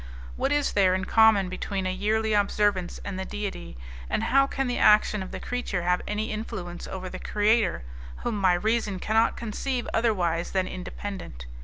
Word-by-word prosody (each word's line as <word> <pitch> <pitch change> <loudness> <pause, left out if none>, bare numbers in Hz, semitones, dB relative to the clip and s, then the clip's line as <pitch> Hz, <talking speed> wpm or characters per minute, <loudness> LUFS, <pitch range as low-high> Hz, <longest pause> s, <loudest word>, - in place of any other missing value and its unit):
What 275 - -1
is 290 -1 +1
there 190 -2 +4
in 190 +1 -2
common 220 -4 +5
between 190 +1 -3
a 185 - 0
yearly 215 +3 0
observance 205 -3 +1
and 195 -2 -4
the - - -2
Deity, 190 - -6 0.3
and - - 0
how 275 +4 +4
can 270 0 -2
the 245 -1 -1
action 210 -1 +5
of 190 - -6
the - - -6
creature 245 -8 -3
have 180 +1 +1
any 210 +1 -2
influence 205 -5 -6
over 185 -1 -6
the - - -7
Creator, 210 - +1 0.4
whom 240 - -1
my 185 -2 +5
reason 210 +1 0
cannot 220 +4 +2
conceive 240 +3 -3
otherwise 180 -7 0
than 190 -1 +1
independent? 180 - -7
205 Hz, 175 wpm, -26 LUFS, 185-220 Hz, 0.4 s, common